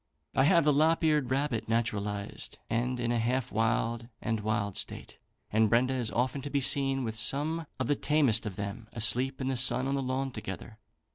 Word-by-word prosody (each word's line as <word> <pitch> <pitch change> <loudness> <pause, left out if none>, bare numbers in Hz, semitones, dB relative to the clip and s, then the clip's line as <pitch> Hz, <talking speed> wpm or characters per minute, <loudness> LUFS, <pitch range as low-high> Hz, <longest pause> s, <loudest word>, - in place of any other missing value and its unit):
"I 135 - +3
have 170 +1 +5
the 150 0 +3
lop 160 +4 +3
eared 150 -5 +2
rabbit 130 -5 -1
naturalised, 105 -3 -2
and 125 +2 -1
in 120 -1 -1
a 120 - +1
half 125 +2 -1
wild 115 +1 0
and 110 0 -2
wild 105 -2 -2
state, - - -5 0.3
and 110 0 +3
Brenda 125 +3 +3
is 125 -4 -1
often 130 +4 -1
to 145 - -6
be 140 0 0
seen 135 0 +2
with 110 -2 -3
some 145 +8 -1
of 130 - 0
the 145 - +1
tamest 135 -8 +2
of 100 - -6
them 100 +3 -6
asleep 120 +4 +3
in 130 - -2
the 135 - 0
sun 130 +1 +4
on 135 - -1
the 140 - 0
lawn 130 +1 -2
together. 110 0 -8
125 Hz, 200 wpm, -29 LUFS, 110-135 Hz, 0.3 s, have